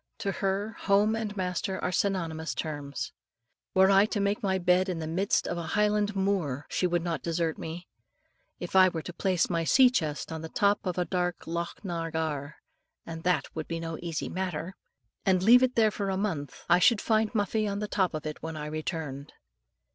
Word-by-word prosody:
To 200 - -2
her, 195 +2 -1
home 205 +2 +3
and 215 -2 -4
master 185 +1 -2
are 180 - 0
synonymous 165 -5 -1
terms. 145 -3 -4 0.6
Were 190 +1 +6
I 195 +2 +6
to 210 - -2
make 200 +1 0
my 190 -2 +1
bed 180 +1 +3
in 180 - -2
the 160 - -4
midst 185 +6 0
of 175 - -2
a 165 - -5
highland 210 0 +2
moor, 185 -9 0
she 180 - +1
would 175 -1 0
not 165 -5 -2
desert 165 -1 -1
me. 170 +3 -6 0.7
If - - -6
I 185 0 +8
were 165 -3 -5
to 175 - -7
place 185 -1 +1
my 170 -2 0
sea 255 +9 +6
chest 155 - -2
on 160 -1 -4
the 160 - -6
top 205 +1 +2
of 180 - -1 0.2
dark 180 -1 -1
Loch 170 +4 -4
na 165 -2 -3
gar, 150 -3 -3 0.5
and 165 -1 -7
that 180 +1 0
would 155 - -4
be 165 -1 -3
no 165 -1 -5
easy 170 -2 -3
matter, 180 -1 -3 0.5
and 185 -1 +2
leave 240 +5 +8
it 255 -1 +2
there 220 -2 +4
for 200 -1 -3
a 190 - -1
month, 165 -9 -3
I 175 +1 +5
should 225 +3 +5
find 220 0 +1
Muffie 215 +1 +1
on 200 0 -2
the 210 +1 -3
top 190 -5 0
of 155 - -5
it 155 -1 -5
when 160 0 -5
I 150 - -4
returned. 150 -2 -4
180 Hz, 205 wpm, -28 LUFS, 160-200 Hz, 0.7 s, I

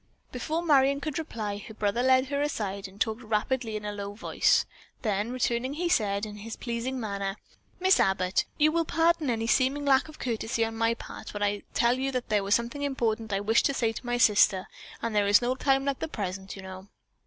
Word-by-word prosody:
Before 310 +7 -2
Marion 280 -3 +4
could 300 +1 -3
reply, 215 -10 -4
her 220 - -10
brother 210 +3 0
led 260 +1 +4
her 285 0 -1
aside 200 -9 -2
and 190 +2 -16
talked 220 +3 -1
rapidly 225 +1 -1
and 210 - -8
in 210 - -3
a - - -8
low 200 0 -6
voice, - - +2 0.4
then 210 0 0
returning 250 +2 -1
he 345 +3 -1
said 205 -6 +1
in 210 -1 -8
his 220 +2 -7
pleasing 245 +2 -3
manner: 200 -3 -3 0.4
"Miss 375 +1 +4
Abbott, 190 -1 +2
you 305 0 +4
will 335 +1 +1
pardon 330 -2 +2
any 225 -1 0
seeming 265 +4 +2
lack 270 0 +4
of 310 - -12
courtesy 230 -1 -1
on 225 0 -5
my 230 +1 +1
part 230 - -9
when 205 - -2
I 205 0 0
tell 240 +2 +3
you 270 +1 -1
there 215 -5 0
was 200 +2 +3
something 235 +4 -2
very 285 - +1
important 225 -5 -1
which 195 - 0
I - - -2
wished 220 +3 +3
to 280 - -2
say 230 -3 +1
to - - -7
my 245 0 -1
sister, 205 -4 +4 0.4
and 230 -1 -1
there 205 -1 +3
is 205 0 +6
no 245 +1 0
time 270 +1 +1
like 280 -1 -1
the - - -2
present, 190 -7 -5
you 195 - -9
know." 190 +1 -9
230 Hz, 225 wpm, -28 LUFS, 205-270 Hz, 0.4 s, is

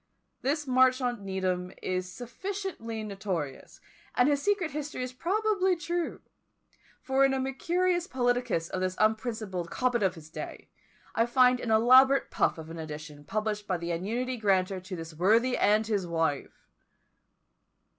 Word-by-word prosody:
This 295 +3 0
Marchmont 255 -2 +3
Needham 185 -2 -2
is 185 0 -3
sufficiently 245 - -5
notorious, 190 -9 -5 0.4
and 245 - +4
his 285 -1 +2
secret 400 -4 +1
history 295 -2 -4
is 250 0 -5
probably 380 - +1
true; 345 0 -3 0.8
for 265 +1 +2
in 270 0 +4
a - - -1
Mercurius 345 +7 0
Politicus 245 -8 0
of 185 - -3
this 185 0 -1
unprincipled 215 -5 -1
Cobbett 245 +1 0
of 190 -2 +1
his 160 -1 -13
day, - - -8 0.4
I 230 +1 +2
found 250 0 +4
an 235 - -4
elaborate 255 +5 +6
puff - - +1
of 160 0 -8
an 165 - -7
edition 150 -1 -8
published 210 +1 -2
by 185 - 0
the 170 0 -4
annuity 235 +9 -2
granter 195 -3 +1
to 185 +1 -7
this 165 -1 -7
worthy 225 +10 +3
and 215 +2 +3
his 205 -5 -1
wife! 165 -4 -2
225 Hz, 145 wpm, -29 LUFS, 185-265 Hz, 0.8 s, elaborate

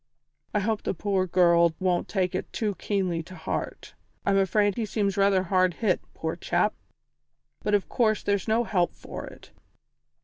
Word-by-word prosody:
I 210 - +3
hope 215 +1 0
the - - -2
poor 190 0 0
girl 170 -2 +4
won't 180 -2 +1
take 185 -3 0
it - - -4
too 210 -3 -1
keenly 185 -4 -1
to 185 +3 -11
heart. - - -5 0.3
I'm 200 - +3
afraid 205 +1 +2
he 230 - -1
seems 205 -2 -1
rather 195 -1 +3
hard 185 -1 +2
hit, 220 - +1
poor - - -3
chap, - - +1 0.9
but 210 - +2
of 200 - 0
course 215 -3 +1
there's 200 0 0
no 225 +2 +2
help 180 -6 0
for - - -8
it. - - -14
195 Hz, 170 wpm, -26 LUFS, 180-210 Hz, 0.9 s, girl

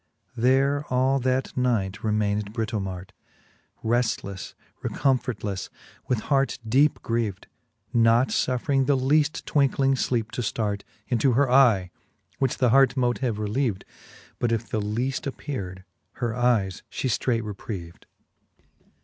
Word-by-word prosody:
There 135 +4 +2
all 130 +2 +2
that 130 +1 -1
night 110 -6 0
remained 105 -1 0
Britomart^ 95 -5 -3 0.7
Reftlefle, 110 -5 -1 0.3
recomfortlefle, 125 -8 -1 0.4
with 120 -4 0
heart 135 +1 +1
deepe 140 +7 +3
grieved. 115 -5 -2 0.5
Not 115 +2 +4
fuffering 135 +1 +1
the 140 -2 +3
leaft 145 +4 +2
twinckling 135 -2 +2
lleepe 115 -4 -1
to - - -3
ftart 105 -2 -2 0.3
Into 125 +1 +2
her 135 +1 +2
eye, 115 -9 +5 0.5
which 135 -2 0
th' - - -22
heart 135 0 +5
mote 120 -1 +1
have 120 -5 -1
relieved. 105 -1 -1 0.5
But 120 - +1
if 115 0 -1
the 110 - -1
leaft 120 +7 -2
appeared, 100 -10 -5 0.3
her 120 -2 -3
eyes 115 -7 +1
fhe - - -4
ftreight 115 -3 0
reprieved. 95 -4 -7
120 Hz, 125 wpm, -25 LUFS, 105-130 Hz, 0.7 s, eye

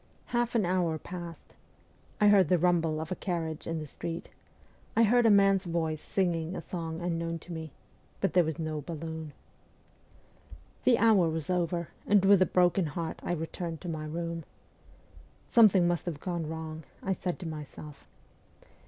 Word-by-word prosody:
Half 240 0 +1
an 215 -5 +3
hour 175 -3 +1
passed. 175 0 -9 0.7
I 210 -1 +6
heard 195 -6 +5
the 180 - +5
rumble 165 -2 +2
of 160 +2 -5
a - - 0
carriage 165 -5 -3
in 165 - -2
the 155 - -4
street; 165 +3 -6 0.7
I 230 - +5
heard 235 +2 +5
a - - +6
man's 195 -2 +5
voice 160 -3 -1
singing 175 -2 -1
a - - -3
song 165 -2 -5
unknown 165 -1 -2
to 170 +2 -10
me; 160 -1 -5 0.5
but 195 - 0
there 180 - +5
was 160 -1 -3
no 155 -2 -3
balloon. 160 0 -6 1.5
The 245 -2 +6
hour 210 -7 +5
was 160 +2 -3
over, 175 -1 -1 0.2
and 200 -1 +4
with 195 -1 +6
a 185 - +5
broken 180 -1 +3
heart 160 +2 -4
I - - -2
returned 165 0 -4
to 180 - -5
my 155 -2 -4
room. 165 +1 -4 0.6
' - - -25
Something 200 -6 +6
must 175 -1 -1
have 160 -4 -3
gone 170 -3 -3
wrong,' 160 0 -6 0.2
I 190 - +1
said 180 -1 -3
to 180 - -6
myself. 150 -1 -9
170 Hz, 170 wpm, -30 LUFS, 160-185 Hz, 1.5 s, I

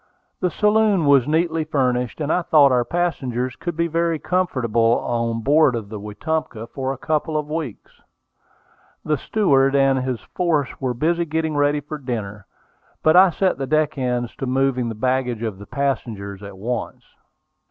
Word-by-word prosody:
The 180 - +1
saloon 210 -3 +2
was 140 -3 +5
neatly 160 +1 +1
furnished, 125 -5 -1
and 150 0 0
I 180 - +2
thought 150 -5 +5
our 125 -1 +3
passengers 130 -6 -2
could 170 -2 -5
be 170 - +2
very 165 0 0
comfortable 120 -11 +1
on 115 -1 -2
board 145 -1 +4
of 110 -3 -5
the 105 -1 -6
Wetumpka 115 +3 -4
for 135 -1 -2
a 135 - -5
couple 155 +2 -1
of 150 -1 -2
weeks. 155 -9 -6 1.0
The 155 -1 +1
steward 140 -10 +2
and 135 -1 +3
his 130 -2 -2
force 160 -6 -1
were 130 -2 -2
busy 170 +6 +1
getting 160 -1 -2
ready 145 0 +2
for 150 +1 -7
dinner; 105 -6 -5 0.6
but 155 - +5
I 185 +1 +8
set 185 -1 0
the 135 - -3
deck 155 0 +1
hands 125 -3 -2
to 135 - -4
moving 130 -2 +1
the 115 - -5
baggage 125 0 -1
of 105 -4 -4
the 100 - -11
passengers 110 -8 -3
at 100 -1 -10
once. 120 +4 -4
135 Hz, 170 wpm, -21 LUFS, 120-160 Hz, 1.0 s, I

